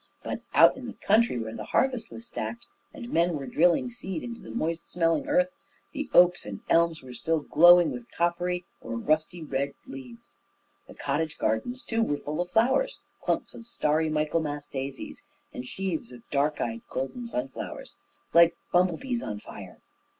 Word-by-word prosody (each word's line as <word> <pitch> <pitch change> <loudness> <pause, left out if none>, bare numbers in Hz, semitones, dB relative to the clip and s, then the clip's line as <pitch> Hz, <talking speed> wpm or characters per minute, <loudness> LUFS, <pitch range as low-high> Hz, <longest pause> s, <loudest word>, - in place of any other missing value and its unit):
But - - -4
out - - +8
in 260 -2 -7
the 245 - -6
country, 220 - +3
where 110 -1 -4
the - - -5
harvest 250 -4 0
was 230 - -10
stacked, 235 0 -5 0.3
and 250 -6 -9
men 170 +1 +3
were 140 -2 -4
drilling 170 - +3
seed 190 -8 -5
into 235 -1 -7
the - - -11
moist 165 -7 -3
smelling 170 - +1
earth, 275 -2 +3 0.4
the 290 -2 -4
oaks 180 0 +6
and 100 -2 -7
elms 165 -2 +3
were 125 -1 -9
still 155 +7 0
glowing 175 +2 +7
with 120 -2 -7
coppery 175 +1 -1 0.2
or 115 - -5
rusty 155 +6 0
red 140 -1 -2
leaves. 125 -3 -11 0.5
The - - -13
cottage 150 +2 -2
gardens, 245 - -1
too, 230 0 0
were 145 -10 +1
full 150 +3 -3
of 175 - -4
flowers 265 - +2 0.2
clumps - - -1
of 235 - -11
starry 155 -6 +1
Michaelmas 150 -1 -1
daisies, 135 -1 -6 0.3
and 125 - -6
sheaves 175 -10 -3
of 120 -2 -13
dark 145 +1 +1
eyed 115 -1 -2
golden 185 - -4
sunflowers, 130 - -5 0.4
like 170 0 +6
bumble 180 -2 +3
bees 245 +1 -3
on 105 - -4
fire. - - -11
165 Hz, 170 wpm, -27 LUFS, 140-225 Hz, 0.5 s, out